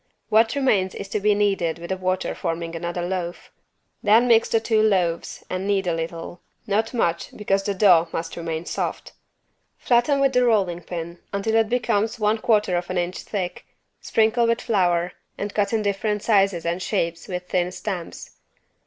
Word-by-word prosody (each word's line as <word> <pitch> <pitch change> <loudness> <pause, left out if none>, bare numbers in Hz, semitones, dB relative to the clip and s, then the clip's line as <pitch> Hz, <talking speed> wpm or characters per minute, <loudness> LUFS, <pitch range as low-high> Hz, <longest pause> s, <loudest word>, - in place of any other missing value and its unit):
What 225 +3 +4
remains 205 -9 +1
is 200 - -6
to 210 - -1
be 210 +1 +3
kneaded 195 -6 +1
with 170 +2 -8
water 185 0 -1
forming 165 0 -4
another 175 +1 -3
loaf. 175 -1 -4 0.5
Then 220 +4 +5
mix 230 -1 +4
the 225 - +3
two 220 -1 +2
loaves 185 -6 0
and 185 +1 -3
knead 200 -2 +1
a 175 - 0
little, 165 +1 -5 0.2
not 220 +1 0
much 170 -9 -1
because 195 -2 +1
the 200 0 -2
dough 180 -4 +5
must 165 0 -4
remain 165 -1 -4
soft. - - -4 0.7
Flatten 250 +4 +2
with 275 -1 +3
the 250 0 +4
rolling 195 -7 +2
pin 170 0 -6
until 200 +3 -1
it 225 -1 +3
becomes 225 -3 0
one 215 +1 +2
quarter 210 -5 +2
of 175 0 -4
an 185 - -2
inch 175 +1 -2
thick, 180 -4 -5 0.3
sprinkle 225 +2 +2
with 230 +1 +1
flour, 180 -5 +1 0.3
and 205 0 -4
cut 200 -1 +1
in 220 -2 0
different 205 +1 -1
sizes 195 -6 +2
and 170 +2 -1
shapes 170 -4 -2
with 180 -1 -5
thin 180 0 0
stamps. 185 -3 -6
195 Hz, 175 wpm, -23 LUFS, 175-220 Hz, 0.7 s, Then